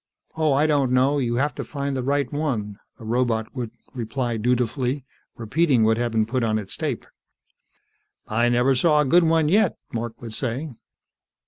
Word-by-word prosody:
"Oh, 155 -2 +2
I 140 +3 +3
don't 145 -4 +2
know. 135 +3 +3
You 120 -3 0
have 145 +4 0
to - - -5
find 140 -1 -4
the 130 - -1
right 140 +3 0
one." 115 -9 -2 0.2
The 115 - -11
robot 115 -1 0
would 120 -3 -3 0.2
reply 120 0 -2
dutifully, 125 +3 0 0.3
repeating 125 +2 +2
what 110 +1 +3
had 120 0 -1
been 110 -1 +2
put 125 +2 -1
on 110 -1 +1
its 100 -3 -5
tape. - - -3 1.2
"I 120 +3 +2
never 125 +3 +3
saw 150 +3 +4
a - - +1
good 175 +7 +5
one 160 -1 +3
yet," 200 +2 +3 0.2
Mark 115 -1 -4
would 115 -2 -7
say. 130 +6 -3
125 Hz, 180 wpm, -23 LUFS, 115-145 Hz, 1.2 s, good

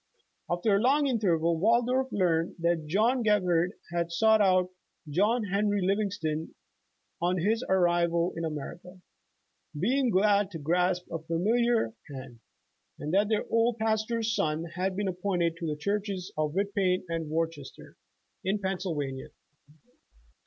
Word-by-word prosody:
After 175 +4 +2
a - - +3
long 280 +4 +3
interval, 170 - +1
Waldorf 245 +6 +2
learned 170 -3 +1
that 170 -2 0
John 225 +10 +2
Gebhard 180 -5 +2 0.2
had 170 -1 -1
sought 220 +5 +4
out 185 -2 +3 0.4
John 210 +10 +1
Henry 205 +1 0
Livingslon 185 -5 -1 0.7
on 180 +2 +1
his 220 +7 +1
arrival 175 -2 +2
in 165 - -4
America, 170 +4 -6 0.8
being 255 - +2
glad 205 0 +3
to 175 - -7
grasp 180 +4 0
a 165 - -3
familiar 220 +9 +1 0.2
hand, 130 -3 -10 0.6
and 150 +3 -5
that 200 +2 +3
their 215 -2 0
old 230 0 +2
pastor's 220 0 0
son 155 -4 0
had 185 +1 -1
been 205 0 -1
ap 180 -1 -4
pointed 175 -4 0
to 170 - -4
the 150 -1 -2
churches 200 0 -3
of 150 -1 -1
Whitpain 195 -2 +1
and 165 -2 -3
Worcester 160 -3 -4 0.5
in 195 +2 0
Pennsylvania. 170 -9 -3
185 Hz, 135 wpm, -28 LUFS, 165-210 Hz, 0.8 s, sought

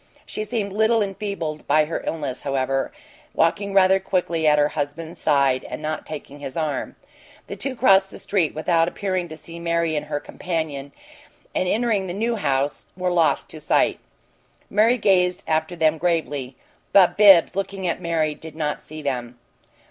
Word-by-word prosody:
She 215 - -4
seemed 210 -3 -3
little 220 +1 +3
enfeebled 195 -6 -4
by 155 0 +4
her 160 - -4
illness, 145 -6 -3
however, 135 -1 -1 0.4
walking 200 +4 +1
rather 190 0 +5
quickly 175 -4 0
at 150 0 +5
her 145 0 +3
husband's 155 +3 -5
side 140 -3 +2
and - - -6
not 155 0 -4
taking 145 -2 -8
his 140 0 -7
arm. 155 -3 -2 0.5
The - - -7
two 275 -2 -4
crossed 195 -6 +4
the - - -9
street 180 -7 0
without 165 +1 +2
appearing 185 -1 -2
to 155 - -8
see 170 +1 -10
Mary 170 -1 0
and 150 0 -3
her 145 -1 -2
companion, 150 -5 -4 0.6
and 185 - 0
entering 215 -2 +1
the 175 - -4
New 230 +3 0
House, 140 -7 -1
were 180 -1 0
lost 165 -5 +2
to 155 - -9
sight. 150 - +2 0.7
Mary 225 +4 +4
gazed 180 -4 +2
after 160 +2 0
them 160 -1 +2
gravely, 145 -7 -1 0.4
but 190 -3 +6
Bibbs, 195 -4 +7
looking 195 -1 -3
at 170 - -1
Mary, 160 -2 0
did 160 +1 -11
not 150 -2 -2
see 155 0 -9
them. 125 -3 -3
165 Hz, 170 wpm, -23 LUFS, 150-195 Hz, 0.7 s, Bibbs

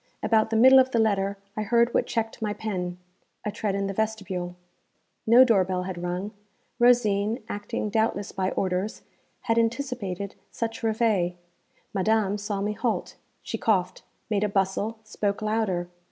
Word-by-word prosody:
About 220 -1 +3
the 225 - -1
middle 260 +4 +8
of 260 0 +4
the 240 - 0
letter 200 -3 +1 0.2
I 215 - -2
heard 235 +3 +2
what - - +2
checked 225 0 -2
my 210 -1 -1
pen 180 -5 -4 0.5
a 210 - -1
tread 205 -1 -2
in 200 0 -1
the 195 - -2
vestibule. 190 -4 -2 0.7
No 240 +3 +8
door 225 -7 +4
bell 180 0 -2
had 180 -2 -5
rung; 180 +4 -3 0.5
Rosine 230 -2 +3
acting 205 0 -4
doubtless 220 -2 0
by 185 0 -1
orders 190 +3 -2 0.4
had 230 0 +1
anticipated 225 -6 -2 0.2
such 225 -1 -4
reveille. 220 -6 +1 0.6
Madame 210 0 +1
saw 205 -1 -3
me 210 +1 -1
halt. 225 +2 -2 0.3
She - - -4
coughed, 185 -5 +1 0.3
made 210 -2 0
a 210 - +1
bustle, 200 +3 0
spoke 205 -2 -2
louder. 215 -5 0
210 Hz, 155 wpm, -26 LUFS, 195-225 Hz, 0.7 s, middle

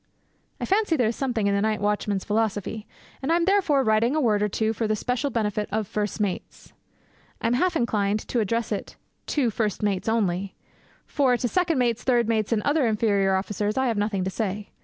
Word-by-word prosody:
I - - -2
fancy 395 -3 +2
there 245 -7 +2
is 230 - -3
something 245 -6 -1
in 200 - +2
the 200 - +1
night 215 0 0
watchman's 205 -1 -1
philosophy; 215 0 -1 0.3
and 275 +4 -1
I - - +5
am 340 0 +2
therefore 360 -8 +3
writing 220 +4 +2
a - - +2
word 215 -7 +2
or 210 - +1
two 220 +2 0
for 225 0 -2
the 215 - +1
special 250 +6 -1
benefit 210 -3 -1
of 215 -1 -1
first 210 +1 -3
mates. 200 -4 -4 0.7
I - - -6
am 230 - +2
half 350 +8 +1
inclined 210 -6 +1
to 245 - 0
address 230 +2 -1
it 205 - -4 0.3
'to 260 -6 +1
first 210 -2 -2
mates 200 0 0
only,' 200 -4 0 0.5
for 260 -4 +2
to 245 - -1
second 340 +2 +1
mates, 240 -2 +1
third 240 -3 +2
mates, 220 -1 0
and 220 -2 +1
other 285 -3 +2
inferior 200 -3 +2
officers 205 +3 -2
I 265 - +2
have 225 - -1
nothing 205 -2 0
to 190 - -2
say. 205 +1 -3
220 Hz, 210 wpm, -25 LUFS, 205-250 Hz, 0.7 s, I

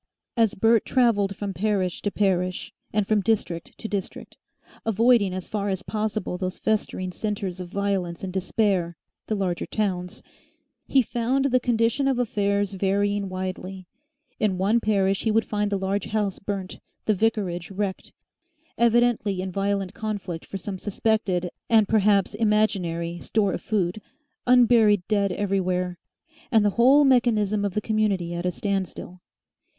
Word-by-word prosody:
As 225 -4 +2
Bert 225 +2 +4
travelled 205 -6 +2
from 200 0 -4
parish 190 -2 -1
to 205 - 0
parish, 185 -3 -1 0.2
and 210 -1 +1
from 215 0 +2
district 195 -6 -2
to 220 - -6
district, 200 -3 -5 0.5
avoiding 225 -2 +3
as 185 0 -5
far 205 -1 -2
as 190 -1 -2
possible 215 -4 -3
those 185 -1 -3
festering 195 -4 -1
centres 200 -2 -4
of 180 -1 -6
violence 195 -3 -2
and 185 -1 -4
despair, 190 -3 0 0.3
the 215 - 0
larger 185 -4 -2
towns, 180 -4 -3 0.6
he 265 -2 +4
found 245 +4 0
the 255 -2 +3
condition 240 +2 +1
of 265 -2 +1
affairs 200 -4 0
varying 200 +1 0
widely. 185 0 -5 0.5
In 200 -4 +1
one 205 +5 +2
parish 195 -3 +1
he 225 - 0
would 225 0 +2
find 210 -1 -1
the 200 - +1
large 195 +1 -1
house 210 -3 -1
burnt, 195 -2 -5 0.3
the 215 - +3
vicarage 195 -5 -1
wrecked, 195 -1 -4 0.7
evidently 235 -4 +2
in 185 0 -3
violent 195 0 -1
conflict 200 -7 -5
for 195 - -5
some 190 0 -6
suspected 195 -4 0 0.2
and 220 -3 +5
perhaps 205 -2 +3
imaginary 195 -6 0
store 205 -1 0
of - - -4
food, 205 -2 -1 0.5
unburied 230 -5 +5
dead 200 -2 +1
everywhere, 180 -2 -1 0.5
and 220 -3 +4
the 205 - +3
whole 260 +7 +5
mechanism 220 -6 +3
of 200 -2 -2
the 210 - +1
community 205 -6 0
at 175 +1 -2
a - - +3
standstill. 185 -1 -4
200 Hz, 150 wpm, -25 LUFS, 185-220 Hz, 0.7 s, and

